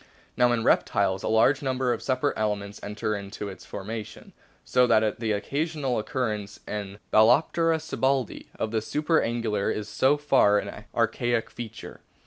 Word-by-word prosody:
Now 125 Hz, 0 st, +4 dB
in 115 Hz, -2 st, 0 dB
reptiles 100 Hz, -4 st, +2 dB
a -, -, -3 dB
large 115 Hz, +6 st, +3 dB
number 130 Hz, -2 st, 0 dB
of 115 Hz, -, -5 dB
separate 130 Hz, +2 st, 0 dB
elements 105 Hz, -1 st, -2 dB
enter 105 Hz, +1 st, -3 dB
into 100 Hz, 0 st, -6 dB
its 95 Hz, -, -11 dB
formation, 105 Hz, +2 st, -7 dB, 0.3 s
so 125 Hz, 0 st, +3 dB
that 110 Hz, -2 st, +2 dB
the 115 Hz, -2 st, -1 dB
occasional 140 Hz, +4 st, -1 dB
occurrence 105 Hz, -5 st, -3 dB
in 100 Hz, -1 st, -5 dB, 0.2 s
Balcenoptera 160 Hz, +9 st, +4 dB
sibbaldii 135 Hz, -5 st, -1 dB
of 110 Hz, -, -2 dB
the 110 Hz, -1 st, 0 dB
supra 155 Hz, +8 st, +1 dB
angular 115 Hz, -4 st, -1 dB
is 105 Hz, -1 st, -3 dB
so 135 Hz, +6 st, +2 dB
far 135 Hz, -8 st, +4 dB
an -, -, -5 dB
archaic 120 Hz, -1 st, 0 dB
feature. 115 Hz, -2 st, -9 dB
115 Hz, 150 wpm, -26 LUFS, 105-130 Hz, 0.3 s, Now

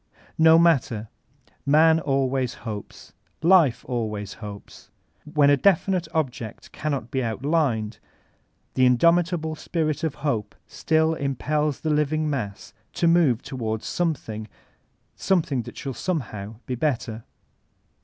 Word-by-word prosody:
No 160 Hz, 0 st, +7 dB
matter: 130 Hz, -10 st, +2 dB, 0.5 s
Man 160 Hz, +3 st, +5 dB
always 135 Hz, -3 st, 0 dB
hopes; 105 Hz, -3 st, -7 dB, 0.3 s
Life 170 Hz, -7 st, +4 dB
always 105 Hz, -5 st, -3 dB
hopes. 105 Hz, -2 st, -10 dB, 0.4 s
When 145 Hz, -2 st, +4 dB
a 145 Hz, -, +5 dB
definite 185 Hz, 0 st, +2 dB
object 125 Hz, -8 st, -4 dB
cannot 140 Hz, -6 st, -3 dB
be 130 Hz, -, 0 dB
outlined, 115 Hz, -2 st, -1 dB, 0.7 s
the 130 Hz, -1 st, +4 dB
indomita 170 Hz, +7 st, +3 dB
ble 160 Hz, 0 st, -4 dB
spirit 155 Hz, -1 st, -2 dB
of 160 Hz, -4 st, -1 dB
hope 115 Hz, -8 st, -1 dB
still 160 Hz, 0 st, +1 dB
impeb 150 Hz, +1 st, -1 dB
the 155 Hz, -, 0 dB
living 150 Hz, +1 st, +1 dB
mass 115 Hz, -10 st, -4 dB, 0.2 s
to 170 Hz, -, +1 dB
move 165 Hz, -8 st, +3 dB
to* 135 Hz, -, -7 dB
ward 110 Hz, -3 st, -3 dB
something 115 Hz, -11 st, -2 dB, 0.4 s
— -, -, -44 dB, 0.2 s
something 165 Hz, -9 st, +1 dB
that -, -, -10 dB
ahall 135 Hz, -3 st, -5 dB
somehow 110 Hz, -, -4 dB
be 130 Hz, -, -3 dB
better. 120 Hz, -4 st, -2 dB
140 Hz, 125 wpm, -24 LUFS, 115-160 Hz, 0.7 s, No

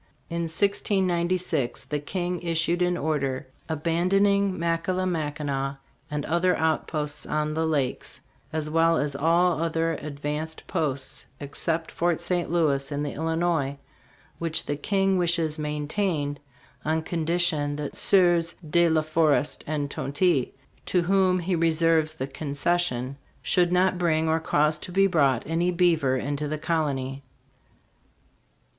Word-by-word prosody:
In 170 Hz, 0 st, -1 dB
1696, 180 Hz, -, 0 dB
the 150 Hz, -, -2 dB
King 175 Hz, +3 st, -3 dB
issued 170 Hz, +1 st, 0 dB
an 180 Hz, 0 st, +2 dB
order 140 Hz, -4 st, -1 dB, 0.2 s
"abandoning 185 Hz, +5 st, +2 dB
Mackillimackinac 160 Hz, -5 st, -1 dB, 0.3 s
and 150 Hz, -1 st, -3 dB
other 175 Hz, +3 st, +2 dB
outposts 155 Hz, -2 st, -1 dB
on 150 Hz, 0 st, -1 dB
the 160 Hz, +1 st, 0 dB
lakes, 140 Hz, -5 st, -2 dB, 0.3 s
as 155 Hz, -1 st, -2 dB
well 165 Hz, +1 st, +3 dB
as 145 Hz, -1 st, -1 dB
all 165 Hz, +3 st, +2 dB
other 165 Hz, 0 st, 0 dB
advanced 150 Hz, +2 st, -5 dB
posts 140 Hz, -4 st, -3 dB
except 160 Hz, +3 st, -2 dB
Fort 170 Hz, -1 st, 0 dB
St. 175 Hz, -2 st, -1 dB
Louis, 150 Hz, -5 st, +1 dB
in 145 Hz, 0 st, -2 dB
the 145 Hz, -, -3 dB
Illinois, 160 Hz, -3 st, 0 dB, 0.6 s
which 165 Hz, -1 st, -1 dB
the 145 Hz, -, -1 dB
King 195 Hz, +4 st, +1 dB
wishes 165 Hz, -3 st, +1 dB
maintained 150 Hz, 0 st, -2 dB, 0.4 s
on 160 Hz, +1 st, 0 dB
condition 165 Hz, -3 st, 0 dB
that 145 Hz, -1 st, -5 dB
Sieurs 175 Hz, -3 st, +3 dB
De 170 Hz, +2 st, +4 dB
la 160 Hz, -1 st, +2 dB
Forest 155 Hz, -2 st, +2 dB
and 145 Hz, -2 st, -2 dB
Tonti, 145 Hz, -2 st, +1 dB, 0.4 s
to 180 Hz, -2 st, +2 dB
whom 190 Hz, 0 st, +3 dB
he 180 Hz, +1 st, -1 dB
reserves 165 Hz, -1 st, +2 dB
the 130 Hz, -, -3 dB
concession, 140 Hz, -2 st, -1 dB, 0.3 s
should 175 Hz, -2 st, +2 dB
not 180 Hz, 0 st, +2 dB
bring 160 Hz, -2 st, +2 dB
or 160 Hz, 0 st, +2 dB
cause 155 Hz, -1 st, +1 dB
to 180 Hz, -, -7 dB
be 195 Hz, +2 st, +4 dB
brought 140 Hz, -10 st, +2 dB
any 165 Hz, +2 st, 0 dB
beaver 170 Hz, -7 st, +2 dB
into 145 Hz, +3 st, -2 dB
the 155 Hz, +1 st, -2 dB
colony." 140 Hz, -5 st, -1 dB
160 Hz, 130 wpm, -26 LUFS, 145-175 Hz, 0.6 s, De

